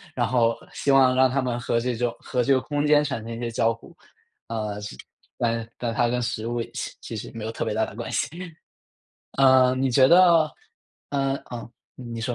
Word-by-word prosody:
然 120 Hz, -2 st, +1 dB
后 115 Hz, -1 st, +2 dB, 0.2 s
希 -, -, -3 dB
望 130 Hz, -2 st, +5 dB
让 130 Hz, 0 st, +5 dB
他 135 Hz, +1 st, 0 dB
们 120 Hz, -1 st, -2 dB
和 120 Hz, -1 st, 0 dB
这 125 Hz, +1 st, -2 dB
种 120 Hz, +1 st, -1 dB
和 125 Hz, -2 st, -1 dB
这 140 Hz, -, +1 dB
个 130 Hz, -, +3 dB
空 145 Hz, +2 st, -2 dB
间 150 Hz, 0 st, +5 dB
产 135 Hz, -5 st, -3 dB
生 115 Hz, -, -7 dB
一 115 Hz, -, -5 dB
些 120 Hz, -1 st, -3 dB
交 115 Hz, 0 st, +2 dB
互。 115 Hz, -, -11 dB, 0.5 s
呃 105 Hz, -2 st, -4 dB
是 105 Hz, -, -7 dB, 0.4 s
但 115 Hz, -1 st, -1 dB
但 120 Hz, -2 st, -3 dB
它 120 Hz, +2 st, +2 dB
跟 125 Hz, +1 st, -1 dB
食 110 Hz, -1 st, -3 dB
物 120 Hz, 0 st, -2 dB
其 -, -, -4 dB
其 -, -, -7 dB
实 110 Hz, -, -7 dB
没 115 Hz, -, -6 dB
有 110 Hz, -, -3 dB
特 -, -, -4 dB
别 -, -, -2 dB
大 110 Hz, +1 st, +1 dB
的 105 Hz, -, -11 dB
关 120 Hz, -, -6 dB
系。 -, -, 0 dB, 1.1 s
呃， 130 Hz, -1 st, +6 dB
你 135 Hz, +1 st, +1 dB
觉 130 Hz, +2 st, +5 dB
得 170 Hz, -2 st, +6 dB, 0.6 s
嗯 135 Hz, -1 st, 0 dB
哦 120 Hz, -1 st, -7 dB, 0.2 s
你 120 Hz, -2 st, -7 dB
说。 120 Hz, +1 st, -2 dB
120 Hz, 235 characters per minute, -24 LUFS, 115-130 Hz, 1.1 s, 呃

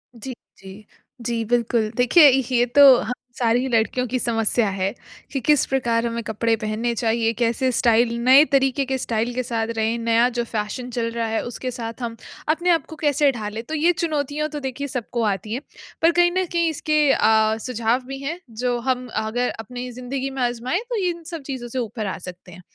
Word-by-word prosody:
जी, 255 Hz, +3 st, -7 dB, 0.2 s
जी। 195 Hz, +2 st, -12 dB, 0.4 s
जी, 230 Hz, -1 st, -2 dB
बिल्कुल। 235 Hz, -1 st, +1 dB
देखिए 285 Hz, +5 st, +7 dB
ये 250 Hz, -2 st, +2 dB
तो 280 Hz, -2 st, +9 dB
हम 240 Hz, -, -3 dB, 0.2 s
सारी 245 Hz, +2 st, +1 dB
लड़कियों 230 Hz, +2 st, +1 dB
की 255 Hz, +2 st, -1 dB
समस्या 225 Hz, -1 st, +4 dB
है 195 Hz, +1 st, -2 dB, 0.4 s
कि 275 Hz, -, -2 dB
किस 295 Hz, +2 st, +3 dB
प्रकार 235 Hz, -3 st, 0 dB
हमें 235 Hz, 0 st, -3 dB
कपड़े 225 Hz, +1 st, 0 dB
पहनने 220 Hz, +2 st, -2 dB
चाहिए, 225 Hz, 0 st, 0 dB
कैसे 240 Hz, +2 st, 0 dB
स्टाइल 235 Hz, 0 st, +3 dB
नए 265 Hz, +4 st, +7 dB
तरीके 270 Hz, 0 st, +2 dB
के 265 Hz, 0 st, -1 dB
स्टाइल 235 Hz, -1 st, -2 dB
के 255 Hz, +1 st, -2 dB
साथ 230 Hz, -2 st, -2 dB
रहें, 220 Hz, +1 st, 0 dB
नया 230 Hz, +1 st, +3 dB
जो 240 Hz, -, +1 dB
फ़ैशन 225 Hz, +3 st, -4 dB
चल 230 Hz, -1 st, -2 dB
रहा 230 Hz, -1 st, -2 dB
है 220 Hz, 0 st, -1 dB
उसके 250 Hz, +1 st, -5 dB
साथ 230 Hz, 0 st, -7 dB
हम 230 Hz, -1 st, -4 dB, 0.3 s
अपने 345 Hz, +3 st, +1 dB
आपको 330 Hz, -2 st, +1 dB
कैसे 290 Hz, -2 st, +2 dB
ढालें, 215 Hz, -2 st, -5 dB
तो 280 Hz, -, -8 dB
ये 320 Hz, +3 st, +3 dB
चुनौतियाँ 305 Hz, -3 st, -2 dB
तो 295 Hz, 0 st, -5 dB
देखिए 270 Hz, +1 st, -4 dB
सबको 240 Hz, -2 st, -3 dB
आती 210 Hz, 0 st, -2 dB
हैं। 255 Hz, -, -3 dB, 0.4 s
पर 330 Hz, +1 st, +5 dB
कहीं 350 Hz, 0 st, +3 dB
न 370 Hz, +1 st, 0 dB
कहीं 335 Hz, -1 st, +1 dB
इसके 305 Hz, 0 st, 0 dB
अ, 220 Hz, 0 st, +3 dB
सुझाव 235 Hz, 0 st, 0 dB
भी 270 Hz, 0 st, -6 dB
हैं 325 Hz, +5 st, -4 dB, 0.2 s
जो 245 Hz, -1 st, +1 dB
हम 255 Hz, -1 st, 0 dB
अगर 220 Hz, +3 st, -1 dB
अपनी 245 Hz, +3 st, -6 dB
ज़िंदगी 255 Hz, +2 st, -4 dB
में 270 Hz, -1 st, -5 dB
आज़माएँ 245 Hz, +6 st, -1 dB
तो 485 Hz, -, -2 dB
इन 340 Hz, -1 st, -6 dB
सब 330 Hz, -, -5 dB
चीज़ों 250 Hz, -2 st, -5 dB
से 255 Hz, +2 st, -4 dB
ऊपर 225 Hz, -2 st, -4 dB
आ 190 Hz, -, -4 dB
सकते 180 Hz, 0 st, -10 dB
हैं। 180 Hz, +1 st, -12 dB
245 Hz, 200 wpm, -22 LUFS, 225-270 Hz, 0.4 s, तो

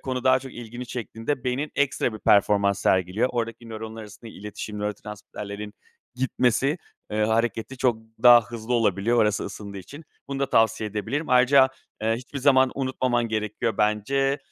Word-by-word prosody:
konu 130 Hz, -1 st, -4 dB
daha 130 Hz, 0 st, +5 dB
çok 130 Hz, 0 st, -10 dB
ilgini 120 Hz, +1 st, -8 dB
çektiğinde 120 Hz, +2 st, -4 dB
beynin 130 Hz, +4 st, -2 dB
ekstra 135 Hz, -4 st, +1 dB
bir 110 Hz, -, -7 dB
performans 100 Hz, -1 st, +3 dB
sergiliyor. 95 Hz, +6 st, +2 dB
Oradaki 115 Hz, -1 st, -4 dB
nöronlar 110 Hz, 0 st, -7 dB
arasında 110 Hz, +2 st, -11 dB
iletişim 105 Hz, +1 st, -7 dB
nörotransmitterlerin 105 Hz, 0 st, -6 dB, 0.4 s
gitmesi, 130 Hz, +3 st, +1 dB, 0.3 s
eee, 105 Hz, 0 st, +1 dB
hareketi 115 Hz, +3 st, -1 dB
çok 120 Hz, -3 st, +2 dB, 0.3 s
daha 120 Hz, -1 st, +9 dB
hızlı 120 Hz, 0 st, -4 dB
olabiliyor, 115 Hz, +1 st, +2 dB
orası 105 Hz, -2 st, +2 dB
ısındığı 100 Hz, -1 st, -7 dB
için. 145 Hz, -, -11 dB, 0.2 s
Bunu 140 Hz, 0 st, -4 dB
da 140 Hz, -, -1 dB
tavsiye 110 Hz, -1 st, +2 dB
edebilirim. 115 Hz, +9 st, -3 dB
Ayrıca, 130 Hz, +2 st, +6 dB, 0.3 s
eee, 110 Hz, +1 st, +2 dB
hiçbir 130 Hz, +3 st, -7 dB
zaman 130 Hz, -1 st, +4 dB
unutmaman 130 Hz, -3 st, 0 dB
gerekiyor 110 Hz, +1 st, -2 dB
bence. 125 Hz, +7 st, +1 dB
115 Hz, 150 wpm, -25 LUFS, 105-130 Hz, 0.4 s, daha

